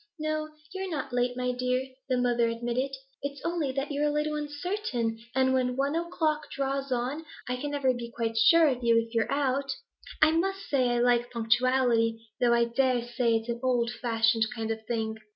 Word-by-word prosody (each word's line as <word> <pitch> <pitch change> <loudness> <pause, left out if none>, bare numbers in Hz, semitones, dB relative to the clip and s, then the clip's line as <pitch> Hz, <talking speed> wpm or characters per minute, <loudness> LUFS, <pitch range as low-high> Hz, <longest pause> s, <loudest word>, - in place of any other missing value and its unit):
'No, 310 0 -2 0.2
you're 380 0 -4
not 290 -6 -4
late, 245 0 0
my 250 0 0
dear,' 250 +1 -1 0.2
the 255 - +2
mother 240 -1 +2
admitted. 240 +4 -2 0.3
'It's 280 0 -4
only 335 -5 0
that 275 +2 -2
you're 290 +1 +1
a - - +1
little 300 +1 0
uncertain, 295 - -2 0.2
and 260 0 +3
when 250 -1 +1
one 280 +2 +1
o'clock 320 -3 -1
draws 275 0 -2
on 255 +6 -1 0.2
I 250 - -1
can 285 +4 -4
never 280 -3 +1
be 240 -1 -6
quite 230 -1 -3
sure 325 +9 +6
of 255 -3 -1
you, 230 -1 +4
if 230 0 -1
you're 230 -1 +1
out. 275 -1 0 0.5
I 315 0 +6
must 385 +4 -1
say 255 -3 +2
I 240 - +1
like 240 0 +3
punctuality, 235 -1 +2 0.2
though 240 -1 +3
I 235 0 +4
dare 245 0 +1
say 240 -1 +1
it's 225 +1 -2
an 235 0 -2
old 245 -2 +1
fashioned 225 -2 +1
kind 225 -1 -2
of 220 0 -4
thing. 220 -2 -2
255 Hz, 195 wpm, -28 LUFS, 235-285 Hz, 0.5 s, sure